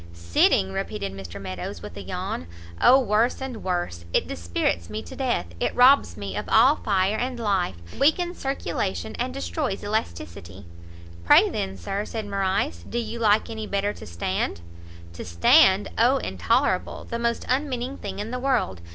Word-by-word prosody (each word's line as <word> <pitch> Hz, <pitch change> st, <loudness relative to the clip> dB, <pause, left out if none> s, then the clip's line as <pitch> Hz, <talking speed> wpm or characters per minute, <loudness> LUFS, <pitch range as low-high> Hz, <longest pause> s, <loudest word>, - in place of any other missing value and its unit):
"Sitting!" 85 Hz, +2 st, +2 dB
repeated 95 Hz, 0 st, -4 dB
Mr 95 Hz, -3 st, -8 dB
Meadows, 95 Hz, -2 st, -6 dB
with -, -, -8 dB
a -, -, -6 dB
yawn, 85 Hz, -, -4 dB, 0.3 s
"O 260 Hz, +2 st, +7 dB
worse 230 Hz, 0 st, +1 dB
and 265 Hz, -4 st, -6 dB
worse! 175 Hz, -, -2 dB
it -, -, +2 dB
dispirits 85 Hz, 0 st, -2 dB
me 105 Hz, +1 st, -5 dB
to -, -, -10 dB
death! 260 Hz, -, 0 dB
it -, -, -1 dB
robs 260 Hz, +3 st, +5 dB
me -, -, -5 dB
of -, -, -4 dB
all 290 Hz, +4 st, +6 dB
fire 195 Hz, +1 st, +1 dB
and 250 Hz, 0 st, -3 dB
life! 195 Hz, -, 0 dB, 0.2 s
it -, -, -11 dB
weakens 345 Hz, +5 st, +2 dB
circulation, 110 Hz, -, -3 dB
and -, -, -1 dB
destroys 90 Hz, -, -3 dB
elasticity." 95 Hz, -, -4 dB, 0.6 s
"Pray 85 Hz, -, +6 dB
then, 95 Hz, 0 st, -3 dB
Sir," 195 Hz, -, -3 dB
said 220 Hz, -2 st, -5 dB
Morrice, 190 Hz, -, -1 dB
"do -, -, -3 dB
you 235 Hz, 0 st, -3 dB
like 215 Hz, -1 st, +3 dB
any 220 Hz, -1 st, -5 dB
better 200 Hz, +1 st, -1 dB
to -, -, -11 dB
stand?" 85 Hz, -1 st, -2 dB, 0.5 s
"To 85 Hz, -, -7 dB
stand? 190 Hz, -, +5 dB
O 250 Hz, +4 st, +5 dB
intolerable! -, -, 0 dB
the 235 Hz, -, -5 dB
most 235 Hz, 0 st, -1 dB
unmeaning 260 Hz, -1 st, -1 dB
thing -, -, -6 dB
in 210 Hz, +3 st, -4 dB
the 250 Hz, -, -3 dB
world! 245 Hz, -, 0 dB
200 Hz, 170 wpm, -25 LUFS, -, 0.6 s, O